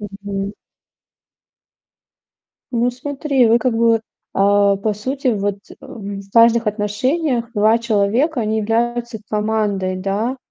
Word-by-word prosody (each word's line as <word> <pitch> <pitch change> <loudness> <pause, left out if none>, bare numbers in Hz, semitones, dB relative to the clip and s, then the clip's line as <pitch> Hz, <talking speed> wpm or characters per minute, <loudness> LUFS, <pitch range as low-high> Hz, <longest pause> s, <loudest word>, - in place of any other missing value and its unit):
Мгм. 200 -1 -5 2.2
Ну, 240 0 +1
смотри, 270 0 0
вы 230 +1 +4
как 250 -1 0
бы, 230 -1 +3 0.3
а, 200 0 +3
по 210 +2 -1
сути, 260 +6 -3
вот, 205 -3 0
э, - - -10
в 205 -7 -7
важных 230 0 +5
отношениях 235 +5 -1
2 215 +2 +4
человека, 235 +6 +1
они 220 0 0
являются 235 +1 -1
командой, 210 -3 -1
да. 200 +7 -2
220 Hz, 115 wpm, -19 LUFS, 205-240 Hz, 2.2 s, важных